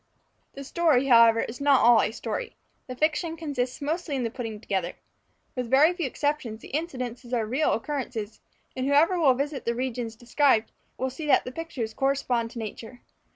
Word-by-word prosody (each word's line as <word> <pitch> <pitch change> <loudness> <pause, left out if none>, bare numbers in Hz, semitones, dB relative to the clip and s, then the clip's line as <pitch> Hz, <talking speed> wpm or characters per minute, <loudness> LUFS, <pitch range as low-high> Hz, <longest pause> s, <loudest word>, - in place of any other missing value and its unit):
The 275 - -8
story, 285 -3 +2
however, 230 -3 +6
is 245 +4 -6
not 280 -2 +4
all 235 -2 +6
a - - 0
story; 455 - -5 0.3
the 255 - -6
fiction 320 +3 0
consists 280 -5 -3
mostly 315 0 -2
in 260 - -1
the 230 - -2
putting 225 -4 -6
together. 190 -5 -2 0.6
With 250 -2 -3
very 290 +7 +5
few 350 -5 -2
exceptions, 260 -5 -2
the - - -11
incidents 255 -6 -4
are 235 -3 0
real 260 +8 +1
occurrences; 230 -4 -4 0.4
and 260 +1 -2
whoever 320 +6 +4
will 275 -6 +5
visit 280 +1 -3
the 235 - 0
regions 245 -2 -3
described, 240 -1 +2 0.3
will 260 0 -2
see 300 +4 -6
that - - +4
the 250 - -5
pictures 260 -7 -5
correspond 260 -3 0
to 240 - -11
nature. 225 +2 -7
255 Hz, 180 wpm, -26 LUFS, 230-295 Hz, 0.6 s, however